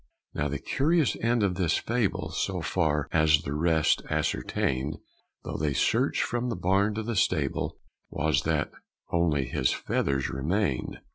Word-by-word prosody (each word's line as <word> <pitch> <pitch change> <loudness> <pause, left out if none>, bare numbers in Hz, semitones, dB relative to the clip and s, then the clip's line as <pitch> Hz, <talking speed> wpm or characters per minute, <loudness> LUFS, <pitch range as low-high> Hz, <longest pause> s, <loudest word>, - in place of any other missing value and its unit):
Now 75 - -1
the 75 0 -2
curious 155 - +1
end 115 -1 +1
of 100 -2 +2
this 90 -3 +1
fable, 115 -3 -1
So - - -1
far 75 -2 0
as 75 -1 +4
the 70 - -3
rest 80 0 +2
ascertained, 65 +3 -1 0.5
Though - - -4
they 75 -1 0
searched - - +2
from 120 +1 -2
the 115 - -2
barn 95 +4 +1
to 110 - -2
the 115 +1 -3
stable, 95 - 0 0.3
Was 80 +1 +1
that - - 0 0.4
_only 80 -6 +1
his 65 0 +1
feathers 70 -1 -1
remained. 80 +3 -1
80 Hz, 150 wpm, -27 LUFS, 75-105 Hz, 0.5 s, as